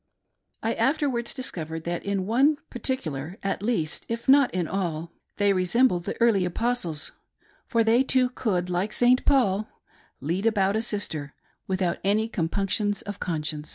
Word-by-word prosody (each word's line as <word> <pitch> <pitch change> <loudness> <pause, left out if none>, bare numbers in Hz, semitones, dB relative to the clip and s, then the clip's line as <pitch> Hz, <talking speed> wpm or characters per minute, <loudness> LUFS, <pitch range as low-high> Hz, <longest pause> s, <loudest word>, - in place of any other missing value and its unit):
I - - +1
afterwards 270 -5 0
discovered 165 - -5
that 170 +1 -3
in 200 -2 -1
one 270 +8 +3
particular, 175 - -3
at 195 0 -1
least, 205 -9 -1
if 230 +2 -4
not 275 -1 +6
in 180 -3 -1
all, 170 -4 -3 0.3
they 205 -1 +3
resembled 185 0 +2
the - - -4
early 230 -5 +4
Apostles, 180 -5 -1 0.6
for 230 -2 +2
they 225 +3 +4
too 260 -1 +2
could, 190 -8 -1
like 180 +4 -1
St. 245 +1 +4
Paul, 215 -7 +3 0.3
" - - -33
lead 175 - -1
about 200 -2 +2
a 220 - +1
sister 160 -10 -3
" - - -42
without 185 -2 0
any 210 +3 +2
com 170 -8 -2
punctions 205 +1 0
of 205 -1 -7
conscience. 150 -3 -3
200 Hz, 160 wpm, -26 LUFS, 175-235 Hz, 0.6 s, not